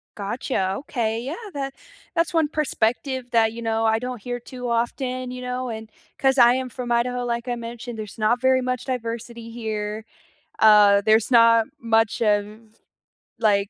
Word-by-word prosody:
Gotcha. 200 -2 -2
Okay, 230 -5 -2
yeah! 275 +7 -4 0.2
That 275 -1 -4 0.4
that's 335 0 +1
one 325 -2 +3
perspective 260 -3 -1
that, 225 -1 +3
you 235 - -7
know, 225 0 0
I 220 0 +3
don't 250 -3 -5
hear 245 +1 -4
too 250 +1 -7
often, 250 +2 -2
you 250 0 -7
know, 250 0 -3
and 220 -1 -7 0.3
'cause 270 0 +2
I 240 0 +7
am 260 -1 -3
from 245 -1 -6
Idaho, 245 +1 +1
like 235 0 -3
I 245 - -1
mentioned, 235 0 -7
there's 215 +1 -7
not 230 +3 +1
very 260 0 +3
much 255 -1 -2
diversity 235 -2 -5
here, 220 -1 -4 0.6
uh, 210 -2 +7
there's 220 +2 +3
not 230 -1 +6
much 225 -1 +1
of, 215 +1 -1 0.6
like 200 -2 +2
235 Hz, 165 wpm, -23 LUFS, 220-250 Hz, 0.6 s, I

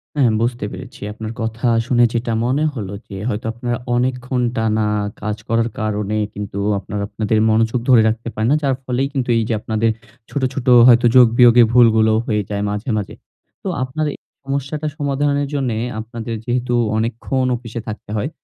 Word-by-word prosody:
হ্যাঁ 130 -6 +3
বুঝতে 120 -1 -1
পেরেছি। 130 -1 -10
আপনার 110 0 -6
কথা 115 +2 -2 0.2
শুনে 120 -1 +3
যেটা 115 0 -1
মনে 130 +5 +1
হলো 100 -6 -5 0.2
যে 95 - -7
হয়তো 110 -2 -3
আপনারা 120 0 -3 0.2
অনেকক্ষণ 125 0 -1
টানা 110 -1 +1 0.4
কাজ 105 0 -3
করার 115 +1 +1
কারণে 105 -1 -1 0.2
কিন্তু 100 -1 -5 0.2
আপনারা 100 +2 -5
আপনাদের 110 0 -1
মনোযোগ 115 +2 +2
ধরে 125 -3 +7
রাখতে 115 +1 -4
পারেন 110 +1 0
না। - - +5
যার 135 -2 +2
ফলেই 130 +2 0
কিন্তু 130 -3 -2
এই 115 - +2
যে - - +1
আপনাদের 110 +1 0 0.4
ছোট, 145 - -3
ছোট 130 -2 -4 0.2
হয়তো 120 0 +6
যোগ 125 -2 +8
বিয়োগে 120 -1 +7
ভুলগুলো 110 -2 +5
হয়ে 105 -2 +1
যায় 100 -1 -2
মাঝে, 105 +4 -4
মাঝে। 105 - -4 0.5
তো - - -5 0.2
আপনার 135 +4 -2
এই - - -11 0.3
সমস্যাটা 140 +3 -3
সমাধানের 145 0 0
জন্য 135 -4 0 0.3
আপনাদের 115 +1 -6
যেহেতু 125 0 -1 0.2
অনেকক্ষণ 120 +4 -1
অফিসে 115 -1 -7
থাকতে 110 -2 -7
হয়। 125 +7 -1
120 Hz, 175 wpm, -19 LUFS, 110-130 Hz, 0.5 s, যোগ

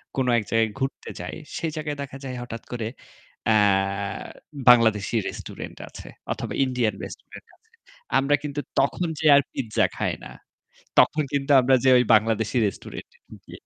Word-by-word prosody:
কোন 130 - +1
এক 110 - 0
জায়গায় 115 0 +4
ঘুরতে 135 0 -4
যাই - - -6 0.2
সেই 165 - -2
জায়গায় 150 -2 -4
দেখা 140 -1 -7
যায় 130 -1 -5
হঠাৎ 115 -2 -7
করে 120 -3 -3 0.6
অ্যা 110 - +4 1.1
বাংলাদেশি 110 -4 +5
রেস্টুরেন্ট - - -8
আছে - - -11 0.2
অথবা - - -5
ইন্ডিয়ান 125 -5 0
রেস্টুরেন্ট - - -11
আছে। 445 - -39 0.5
আমরা 140 +2 +2
কিন্তু 145 -1 -4 0.2
তখন 140 +6 +1
যেয়ে 155 -1 +5
আর 140 - +5
পিজ্জা 115 -5 0
খাই - - 0
না। - - -9 0.7
তখন 155 - +5
কিন্তু 140 0 -1
আমরা 130 +1 +3
যেয়ে 130 -1 +6
ওই 125 - +3
বাংলাদেশি 110 +1 +1
রেস্টুরেন্ট 100 - -7
এ - - -34
ঢুকি। - - -15
130 Hz, 160 wpm, -24 LUFS, 115-140 Hz, 1.1 s, যেয়ে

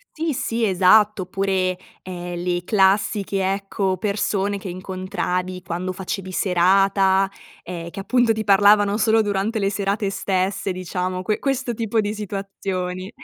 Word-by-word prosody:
Ti 320 -1 -1
sì, 230 -2 -1
esatto. 200 +2 +4
Oppure, 185 -1 -1 0.3
ehm, 175 -1 -6
le 175 -1 -1
classiche, 195 -1 +2
ecco, 195 -1 -2
persone 200 +1 -1
che 195 - -8
incontravi 185 0 -3
quando 180 +1 -4
facevi 185 0 -5
serata, 195 +1 +3 0.3
ehm, 170 -1 -6
che 195 - -8
appunto 240 +2 +2
ti 220 0 -3
parlavano 205 0 +5
solo 225 0 +3
durante 205 +2 -1
le 195 -2 +1
serate 200 0 -1
stesse 190 0 -1
diciamo, 185 0 -3
que 210 +3 -1
questo 270 -3 -1
tipo 225 0 0
di 205 0 -2
situazioni. 195 -2 -4
195 Hz, 135 wpm, -22 LUFS, 185-205 Hz, 0.3 s, parlavano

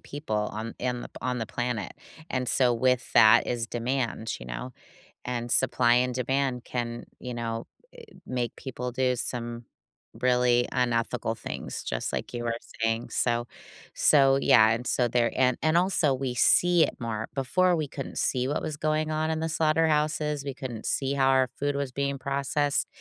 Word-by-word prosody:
people 145 -7 -4 0.2
on 110 +2 -5
in 125 -1 -2
the - - -8
p - - -43
on 125 -1 -2
the 115 - -3
planet, 120 -6 -3 0.4
and 125 -1 -2
so 125 -2 +3
with 125 +1 +1
that 115 0 +7
is 120 -1 -2
demand, 120 -2 -2
you - - -9
know, 60 - -6 0.5
and 120 -1 -3
supply 125 -2 +3
and 125 0 +2
demand 130 0 -1
can, 120 -1 -4
you 125 - -6
know, 115 -1 -4 0.5
i - - -17
make 125 -2 -3
people 125 -2 -5
do 125 0 +1
some 120 -1 -4 0.6
really 125 -1 +3
unethical 120 -2 0
things, - - -6
just - - -3
like - - -4
you 120 -1 -4
were 115 -1 -1 0.3
saying, 115 +1 0
so 120 -1 0 0.5
so 135 -2 +4
yeah, 110 0 +6
and 120 +2 -2
so 125 - +2
there 120 0 +1
and 125 -1 +3
and 155 +2 +3
also 175 -6 +2
we 130 -1 -3
see 175 +7 +5
it - - -1
more, 110 -2 -3
before, 180 +7 +2
we 155 -3 -2
couldn't 135 0 -7
see 125 -1 0
what 145 - -1
was 155 -2 -3
going 155 0 0
on 155 0 0
in 160 0 -1
the 160 - -1
slaughterhouses, 155 -2 +1
we 140 -2 -5
couldn't 125 -6 -6
see 135 0 0
how 135 -1 +2
our 130 -1 +4
food 145 0 0
was 140 -2 -2
being 140 +1 -2
processed 140 +2 0
125 Hz, 180 wpm, -27 LUFS, 120-140 Hz, 0.6 s, that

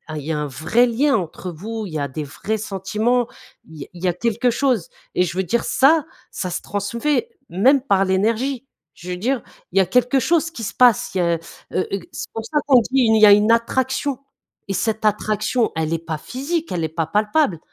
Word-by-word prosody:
il 150 - -4
y 155 - -3
a 155 - -1
un 150 - -2
vrai 155 - +2
lien 270 +4 +2
entre 180 0 -5
vous, 215 +7 -6
il 170 - -10
y 155 - -2
a 140 - -1
des 145 +3 -5
vrais 195 +10 -4
sentiments, 215 +5 0 0.4
il 160 -2 -11
y - - -5
a - - -20
il 175 - -11
y - - +2
a 175 - +2
quelque 235 +6 0
chose 235 -6 0 0.3
et 180 - +3
je 170 -1 -4
veux 190 - +1
dire, 230 +7 0
ça, 285 +4 +3 0.3
ça 185 - -4
se - - -3
transmet 235 - -1 0.2
même 260 +10 +4
par 195 -7 +2
l'énergie! 230 +8 0 0.3
Je 175 - -11
veux 180 - -3
dire, 250 +7 -1 0.3
il 195 - +3
y - - +7
a - - +2
quelque 250 +2 +2
chose 330 +4 +1
qui 240 - -8
se 195 - -5
passe, 245 -6 +4
il - - +1
y - - +3
a, 170 -1 +2 0.4
heu 185 - 0
heu, 195 - -1
c'est 305 - -7
pour 225 0 -5
ça 300 +3 0
qu'on 260 -4 +6
dit: - - -5
«Il 230 -5 +4
y - - +10
a 205 - +8
une 210 +2 +5
attraction!» 260 +3 0 0.5
Et 195 - -2
cette 220 +3 -1
attraction, 215 +3 +1
elle 160 -1 -1
est - - +1
pas 160 -2 -3
physique, 310 - -4
elle 170 -2 -1
est 160 - -1
pas 160 0 -2
palpable, 210 - +1
215 Hz, 235 wpm, -21 LUFS, 180-250 Hz, 0.5 s, y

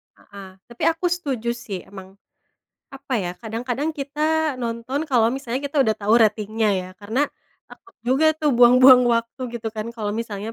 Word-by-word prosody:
Heeh. 200 -2 -13 0.2
Tapi 235 - -8
aku 330 +2 0
setuju, 265 -9 -2
sih. 205 -6 -7
Emang, 190 -1 -12 0.8
apa 270 -1 -5
ya, 180 -4 -2
kadang-kadang 245 +6 -3
kita 300 +1 -1
nonton 235 +4 -3
kalau 235 -5 +3
misalnya 260 -1 -4
kita 285 0 0
udah 220 - +1
tahu 210 +2 +1
ratingnya, 215 0 +1
ya. 180 - -8
Karena, 225 +8 0 0.4
takut 390 -1 -17
juga 270 +6 +2
tuh, 305 -2 +1
buang-buang 250 +1 +7
waktu, 235 +2 -1
gitu 225 -1 -4
kan, 215 +1 -5
kalau 210 -3 -3
misalnya 220 -1 -5
235 Hz, 160 wpm, -22 LUFS, 220-275 Hz, 0.8 s, buang-buang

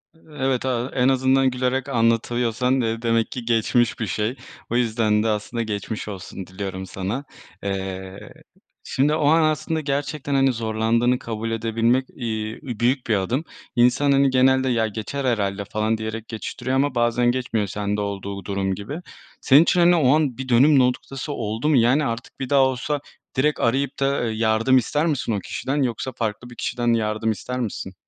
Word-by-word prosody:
Evet, 135 -5 -2
aaa, 125 0 -1
en 125 0 +3
azından 130 0 +3
gülerek 130 +2 -1
anlatıyorsan, 120 +1 +1
eee, 115 0 -2
demek 115 -1 +1
ki 125 -2 -6
geçmiş 120 +1 +1
bir 110 - -2
şey. 105 +7 -1 0.3
O 120 - -2
yüzden 110 -3 +2
de - - 0
aslında 110 +2 -1
geçmiş 105 0 -4
olsun 95 -1 -7
diliyorum 95 0 -5
sana. 100 +10 -4 0.4
Eee, 95 -1 -5 0.5
şimdi 145 +3 +1
o 150 -2 +1
an 160 +2 +5
aslında 155 +1 0
gerçekten, 145 0 -2
hani, 135 -1 +3
zorlandığını 115 +2 +1
kabul 115 -1 -4
edebilmek, 115 +3 +1
iii, 110 -2 -4 0.2
büyük 125 +2 +1
bir 110 - +2
adım. 120 - -1 0.3
İnsan, 125 +4 +4
hani, 135 0 +4
genelde, 130 0 +3
ya 115 -2 +1
geçer 115 +6 -4
herhâlde 100 -4 0
falan, 110 +2 -1
diyerek 110 +1 -5
geçiştiriyor 125 +3 -4
ama 135 -1 +1
bazen 120 +1 +2
geçmiyor 115 -5 -1
sende 105 +1 -2
olduğu 100 -1 -5
durum 95 -1 -1
gibi. 140 - -6 0.4
Senin 145 +4 +6
için, 180 - +2
hani, 175 0 +6
o 145 -3 +4
an 145 -6 0
bir 130 -1 -6
dönüm 135 +4 +6
noktası 135 +3 -1
oldu 115 +5 -2
mu? 150 - +4
Yani, 130 +6 +3
artık 115 +3 -5
bir 130 - -4
daha 140 -1 +5
olsa 135 +3 0 0.4
direkt 150 +3 +1
arayıp 135 +4 0
da, 135 -2 +1
eee, 110 - -4
yardım 115 +3 +3
ister 150 +6 +1
misin 145 -7 -1
o 100 - 0
kişiden 135 +8 -2
yoksa 125 +2 -2
farklı 115 +1 -4
bir 120 - -12
kişiden 120 -1 0
yardım 110 0 0
ister 125 +4 -4
misin? 100 -4 -4
120 Hz, 175 wpm, -23 LUFS, 110-135 Hz, 0.5 s, Senin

